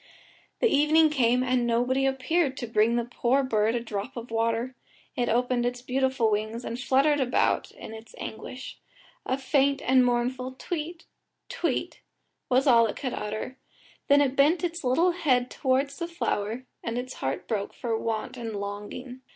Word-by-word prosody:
The - - +5
evening 310 -2 +4
came, 250 -3 +3
and 250 -1 +1
nobody 250 +3 +2
appeared 270 +2 0
to 245 - -3
bring 225 +1 +2
the 240 -1 0
poor 245 +3 +1
bird 225 -2 +1
a - - +1
drop 220 +2 -5
of 235 0 -7
water; 230 +2 0 0.4
it 245 -3 0
opened 245 +1 +1
its 245 0 -2
beautiful 260 -3 +1
wings, 220 +3 -2
and 235 - -4
fluttered 275 +3 +3
about 255 -2 +1
in 220 - -10
its 220 0 -11
anguish; 255 +4 -7 0.5
a 260 - +1
faint 275 +1 +2
and 260 0 +5
mournful 250 +1 0
"Tweet, 330 +4 -5 0.4
tweet," - - -2 0.5
was 260 +2 +3
all 235 -4 +6
it 210 - -4
could 255 -4 -4
utter, 215 +5 -5 0.5
then 285 0 +6
it 275 -2 +1
bent 305 +6 +4
its 340 -1 -2
little 325 +8 +3
head 255 -8 +1
towards 275 +2 0
the 340 - -2
flower, 245 -8 -2 0.2
and 230 +1 -3
its 255 +1 -4
heart 135 +1 -2
broke 205 -3 -2
for 230 -2 -3
want 220 +2 -3
and 225 -3 -5
longing. 205 +6 -6
250 Hz, 165 wpm, -27 LUFS, 230-270 Hz, 0.5 s, all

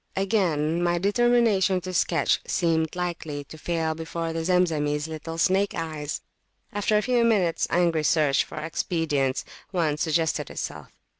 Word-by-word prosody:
Again, 175 -5 +1
my 175 0 +2
determination 205 -1 +3
to 185 +1 -6
sketch 170 -1 +2
seemed 160 -2 +1
likely 170 -5 -4
to 140 - -12
fail 160 0 -1
before 165 +1 -4
the 165 0 -2
Zemzemis 160 -4 +1
little 160 +1 -6
snakes 190 +4 +2
eye. 155 -3 -4 0.7
After 205 +1 +1
a 210 - +1
few 245 -2 +2
minutes 200 -8 +2
angry 170 -2 +2
search 150 -3 +3
for - - -11
expedients, 155 -4 -1 0.2
one 160 -6 0
suggested 160 +1 0
itself. - - -6
165 Hz, 140 wpm, -25 LUFS, 155-185 Hz, 0.7 s, determination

